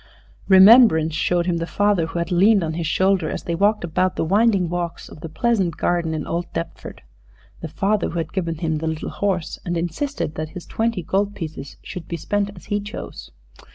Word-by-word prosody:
Remembrance 190 Hz, -5 st, +7 dB
showed 175 Hz, +2 st, 0 dB
him 175 Hz, -2 st, 0 dB
the 165 Hz, 0 st, -3 dB
father 205 Hz, -5 st, +1 dB
who 165 Hz, -, -6 dB
had 170 Hz, 0 st, -2 dB
leaned 195 Hz, +2 st, +4 dB
on 160 Hz, -1 st, -2 dB
his 165 Hz, -1 st, -3 dB
shoulder 185 Hz, -1 st, +1 dB
as -, -, -5 dB
they 170 Hz, -, -3 dB
walked 205 Hz, +4 st, +2 dB
about 180 Hz, +2 st, 0 dB
the -, -, -1 dB
winding 200 Hz, 0 st, +3 dB
walks 175 Hz, 0 st, -4 dB
of -, -, -13 dB
the 165 Hz, -, -6 dB
pleasant 195 Hz, -3 st, 0 dB
garden 170 Hz, -2 st, 0 dB
in 155 Hz, -, -4 dB
old 170 Hz, +1 st, -3 dB
Deptford 85 Hz, -, -6 dB, 0.6 s
the 165 Hz, -, -6 dB
father 195 Hz, +6 st, 0 dB
who 170 Hz, -, -5 dB
had 165 Hz, -, -3 dB
given 170 Hz, -4 st, -2 dB
him 160 Hz, -1 st, -1 dB
the 160 Hz, -, -3 dB
little 160 Hz, -1 st, -4 dB
horse, 190 Hz, -5 st, -2 dB
and 175 Hz, -1 st, -2 dB
insisted 175 Hz, -, -3 dB
that 155 Hz, 0 st, -5 dB
his 180 Hz, +1 st, -9 dB
twenty 225 Hz, -5 st, -2 dB
gold 200 Hz, +5 st, -1 dB
pieces 155 Hz, -5 st, -7 dB
should 180 Hz, -, -8 dB
be 170 Hz, -, -4 dB
spent 205 Hz, +5 st, -1 dB
as 175 Hz, -, -14 dB
he 205 Hz, -, -1 dB
chose. 205 Hz, 0 st, -8 dB
175 Hz, 205 wpm, -21 LUFS, 165-200 Hz, 0.6 s, Remembrance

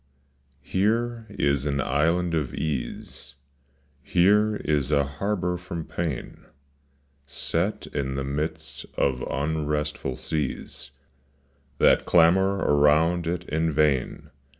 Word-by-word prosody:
MERE 115 Hz, +4 st, 0 dB
is 70 Hz, -7 st, 0 dB
an 70 Hz, -1 st, 0 dB
island 85 Hz, +5 st, +1 dB
of 75 Hz, -5 st, -1 dB
ease, 65 Hz, -6 st, -5 dB, 0.7 s
Here 105 Hz, +6 st, +3 dB
is 75 Hz, -3 st, +1 dB
a 70 Hz, -2 st, +3 dB
harbor 90 Hz, +5 st, -2 dB
from 85 Hz, -2 st, -6 dB
pain 80 Hz, -7 st, -5 dB, 0.8 s
Set 85 Hz, +7 st, -2 dB
in 65 Hz, -2 st, -3 dB
the 70 Hz, -, -2 dB
midst 75 Hz, +1 st, -4 dB
of 65 Hz, -2 st, +1 dB
unrestful 75 Hz, -2 st, -2 dB
seas 70 Hz, -3 st, -4 dB, 0.9 s
That -, -, +4 dB
clamor 95 Hz, +3 st, +5 dB
around 80 Hz, +2 st, +3 dB
it 85 Hz, +1 st, -3 dB
in 80 Hz, +1 st, 0 dB
vain. 75 Hz, -5 st, 0 dB
80 Hz, 105 wpm, -25 LUFS, 70-90 Hz, 0.9 s, clamor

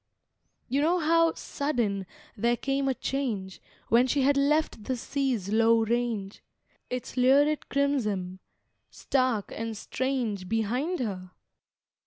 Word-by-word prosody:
You 270 Hz, +3 st, +1 dB
know 335 Hz, +4 st, +3 dB
how, 330 Hz, 0 st, +3 dB
sudden, 225 Hz, -10 st, -2 dB, 0.3 s
there 235 Hz, +3 st, +1 dB
came 275 Hz, +1 st, -1 dB
a 265 Hz, -, +1 dB
change, 220 Hz, -9 st, -3 dB, 0.3 s
When 240 Hz, +3 st, +5 dB
she 275 Hz, +1 st, +1 dB
had 280 Hz, +1 st, +4 dB
left 280 Hz, -5 st, +1 dB
the 255 Hz, -, -1 dB
sea's 250 Hz, -6 st, -2 dB
low 225 Hz, +1 st, +4 dB
range, 225 Hz, -3 st, -2 dB, 0.5 s
Its 250 Hz, 0 st, -5 dB
lurid 285 Hz, +4 st, +3 dB
crimson, 215 Hz, -10 st, 0 dB, 0.5 s
stark 255 Hz, -6 st, -1 dB
and 225 Hz, -1 st, -4 dB
strange, 235 Hz, -8 st, -2 dB
Behind 245 Hz, -, -1 dB
her? 185 Hz, -6 st, -4 dB
245 Hz, 120 wpm, -28 LUFS, 215-280 Hz, 0.5 s, When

